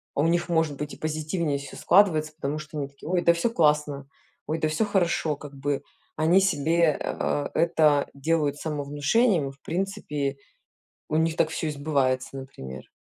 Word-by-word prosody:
а - - +2
у 160 - +3
них 175 +1 +1
может 160 -4 +1
быть 150 +1 -5
и - - -10
позитивнее 155 0 -1
всё 140 0 -9
складывается, 165 -5 +3
потому 150 -1 -3
что 155 0 -8
они 140 -2 -2
такие: 140 +3 -11
"Ой, 180 -1 +2
да 170 - +5
всё 170 +7 0
классно, 150 -6 +1 0.4
ой, 160 +1 -1
да 155 - +1
всё 185 +8 +1
хорошо 170 -6 +1
как 145 -1 -11
бы". 140 0 -2 0.3
Они 165 +4 +4
себе, 165 -3 +2
а, 145 - -1
это 155 -4 +3
делают 145 0 0
самовнушением, 150 - +1
в 135 0 -21
принципе 160 -7 -3 0.7
у - - -1
них 160 0 +1
так 160 - +2
всё 160 0 -3
и - - -1
сбывается, 140 -3 0
например. 65 - -9
155 Hz, 175 wpm, -26 LUFS, 145-165 Hz, 0.7 s, да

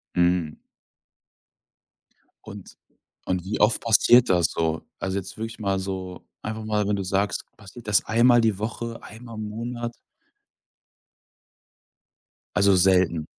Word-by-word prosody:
Hm. 85 -3 +2 1.9
Und - - -11 0.5
und 90 -1 -2
wie 105 - -3
oft 105 +1 +4
passiert 120 +2 +5
das 85 -3 +3
so? 80 -1 -2 0.2
Also 95 0 -2
jetzt 95 +2 -6
wirklich 115 +1 -6
mal 100 -2 -1
so 95 -1 -6 0.2
einfach 110 0 -5
mal 105 -1 0
wenn 105 - +1
du 100 - -3
sagst, 95 +1 -1
passiert 110 +4 -14
das 105 -1 +3
einmal 120 +1 +4
die 110 -4 +1
Woche, 115 +1 -5
einmal 115 +1 -11
im 110 0 -4
Monat? 120 +2 -5 2.6
Also, 100 -1 +4
selten? 90 -4 +3
100 Hz, 125 wpm, -24 LUFS, 95-115 Hz, 2.6 s, passiert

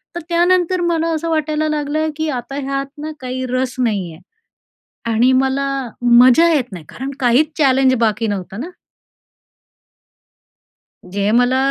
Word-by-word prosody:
तर - - -2
त्यानंतर 355 +1 +2
मला 335 -1 0
असं 330 +1 -3
वाटायला 310 -1 0
लागलं 305 +1 -1
की 315 0 -2
आता 250 -1 -5
ह्यात 275 0 -2 0.2
ना 310 +1 -5
काही 255 0 -4
रस 255 0 -2
नाही 205 -8 -1
आहे 160 - -15 0.9
आणि 240 +4 +3
मला 265 +1 +1 0.3
मजा 245 +6 +6
येत 255 -6 -1
नाही, 175 -5 -9
कारण 265 +2 -6
काहीच 260 +4 +3
चॅलेंज 265 -3 +3
बाकी 225 0 +1
नव्हतं 195 0 -5
ना. 325 - -6 2.4
जे 200 +3 -2
मला 245 +3 +3
265 Hz, 140 wpm, -18 LUFS, 240-310 Hz, 2.4 s, मजा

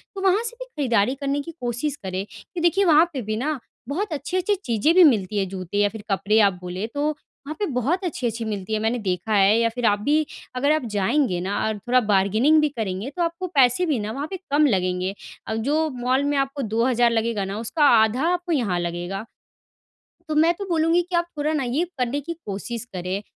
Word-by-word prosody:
तो 385 - -5
वहाँ 390 +3 +3
से 475 0 -4
भी - - -6
खरीदारी 255 - 0
करने 280 +1 -2
की 335 - -8
कोशिश 245 +4 -2
करें 190 +1 -3 0.3
कि 345 - -2
देखिए 365 +4 +3
वहाँ 320 0 +6
पे 265 - -3
भी 215 0 -3
ना, 290 +2 -2 0.3
बहुत 360 +5 -2
अच्छी-अच्छी 365 +7 -1
चीज़ें 235 +6 +2
भी 370 - +8
मिलती 210 - +3
हैं 195 -1 0
जूते 185 0 -5
या 205 0 +3
फिर 210 0 -9
कपड़े 210 +3 +2
आप 200 -3 +5
बोले 180 +3 -4
तो, 285 +5 -2
वहाँ 295 0 -11
पे 415 - +1
बहुत 290 - -1
अच्छी-अच्छी 240 - -2
मिलती 210 -1 -4
है 215 - +1
मैंने 225 +3 0
देखा 190 +1 -2
है, 200 +2 +5
या 230 - +3
फिर 235 +1 -3
आप 205 -1 +3
भी 300 +7 +2 0.3
अगर 280 +4 +2
आप 310 -5 +1
जाएँगे 215 -1 +1
ना 195 +3 -2
और 220 -1 -2
थोड़ा 245 +5 +2
बार्गेनिंग 215 +8 +3
भी 300 - +2
करेंगे 220 -2 -4
तो 350 - 0
आपको 335 +2 -3
पैसे 275 +1 +3
भी 290 -8 0
ना 210 +1 -3
वहाँ 280 +5 -4
पे 380 - -3
कम 295 +2 +4
लगेंगे। 185 -3 0 0.3
अब 220 - -2
जो 315 +1 +2
मॉल 255 +3 +1
में 285 0 0
आपको 275 +1 -1
2 225 +1 0
हज़ार 240 -2 +3
लगेगा 225 -3 0
ना 195 +2 -4
उसका 295 +7 -1 0.2
आधा 245 +8 0
आपको 355 0 -3
यहाँ 220 - +1
लगेगा। 175 +4 -4 1.0
तो 305 - -2
मैं 325 +3 +4
तो 400 +3 -6
बोलूँगी 330 +1 +3
कि, 355 +1 -4
आप 340 0 +2
थोड़ा 295 +1 0
ना 300 -3 0
ये 260 +7 0
करने 250 +3 -1
की 335 +4 -5
कोशिश 215 +4 -5
करें। 185 +2 -3
245 Hz, 220 wpm, -23 LUFS, 205-305 Hz, 1.0 s, भी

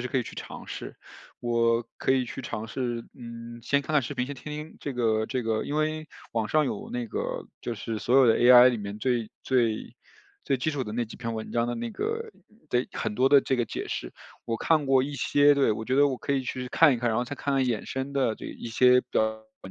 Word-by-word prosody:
实 125 - -3
可 135 - -2
以 130 - +2
去 - - -9
尝 - - -8
试， - - -7 0.4
我 115 -1 +2 0.2
可 - - +2
以 130 -1 +2
去 130 - -7
尝 115 -3 -5
试， 120 0 -3
嗯， 115 -1 -9
先 140 +3 +1
看 155 - -5
看 150 - +5
视 120 - -5
频 125 - 0
先 145 - -5
听 145 +3 -9
听 150 +2 -7
这 140 - -4
个 110 -2 +1
这 130 -2 -2
个 110 -1 -1
因 145 - -4
为 155 0 -1 0.2
网 110 -2 -1
上 155 +3 +3
有 110 -7 -4
那 120 -1 -3
个 - - -4
就 120 - -4
是 110 +1 -4
所 125 +5 +2
有 135 -2 +7
的 115 - +4
AI 125 +1 +9
里 120 - -3
面 100 0 -6
最 120 -2 0
最 120 -4 0 0.5
最 135 - +1
基 130 +5 -1
础 140 -2 -2
的 105 -3 -6
那 120 +1 -1
几 110 - -11
篇 115 -2 -4
文 110 0 -6
章 120 0 +1
的 120 - -1
那 115 0 -4
个 450 - -3 0.4
得 125 +1 0
很 110 -2 -3
多 130 +4 +3
的 140 0 +7
这 135 - 0
个 120 -2 +1
解 - - -5
释， - - -5 0.3
我 115 -1 -1
看 155 0 +2
过 135 -1 +4
一 145 +2 -4
些。 145 +2 +4
对 140 -4 +3
我 110 +1 -4
觉 125 - 0
得 145 +1 +5
我 130 - -2
可 - - -2
以 135 -1 +1
去 125 0 -4
看 155 +1 +5
一 - - -1
看， 120 - 0
然 110 - 0
后 125 - 0
再 145 +3 -6
看 140 - -1
看 135 -1 +2
衍 120 -4 -1
生 135 +1 -4
的 130 -5 +1
这 - - -9
一 - - -8
些 125 +2 +5
的 - - +3 0.4
文 95 - -9
125 Hz, 280 characters per minute, -27 LUFS, 115-140 Hz, 0.5 s, AI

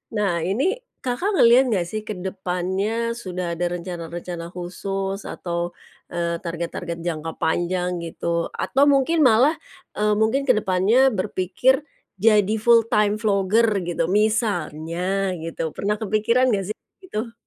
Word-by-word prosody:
Nah, 205 -3 +1
ini 195 +10 0 0.4
Kakak 260 +11 -1
ngeliat 245 -6 +6
nggak 190 -6 +1
sih 215 - -3
ke 215 - -2
depannya 190 +5 -2
sudah 185 -5 -4
ada 175 - 0
rencana-rencana 175 -1 -6
khusus 195 +2 -4
atau, 175 0 -4 0.4
eee, 170 0 -1
target-target 170 0 -4
jangka 165 -1 -3
panjang 175 +2 0
gitu 165 - -8 0.3
atau 275 +2 +1
mungkin 285 +3 +3
malah, 250 +7 +5 0.4
eee, 210 0 +2
mungkin 225 +6 +2
ke 255 - +6
depannya 210 +7 +3
berpikir 195 - +1 0.4
jadi 210 -1 +4
full 235 -1 +7
time 210 0 +3
vlogger 210 +1 +3
gitu, 175 -1 -1
misalnya 190 -2 0
gitu 165 0 -5
pernah 210 +1 -1
kepikiran 225 +4 +2
gak 195 -1 -1
sih 215 - -3 0.3
gitu? 230 - -5
195 Hz, 130 wpm, -23 LUFS, 175-225 Hz, 0.4 s, full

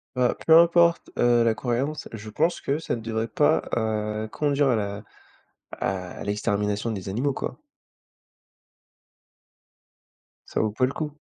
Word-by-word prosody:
Bah, 125 -1 +2
peu 160 0 +9
importe, 170 0 +4
heu, 120 -1 +4
la 115 -1 +3
croyance, 135 +6 -2
je 110 -1 -7
pense 165 +10 0
que 140 +3 -1
ça 160 - -2
ne 115 - -7
devrait 110 0 -2
pas, 150 +7 +2
heu, 110 -1 -2
conduire 145 -2 +1
à 120 - +3
la 100 0 -4 0.7
à 90 -1 -4
l'extermination 105 +1 -1
des 95 -2 -5
animaux, 130 +6 -1
quoi. - - -5 2.9
Ça - - -2
vaut 110 - +1
pas 125 +4 +1
le 130 - -2
coup! 150 -1 -4
115 Hz, 145 wpm, -25 LUFS, 105-145 Hz, 2.9 s, peu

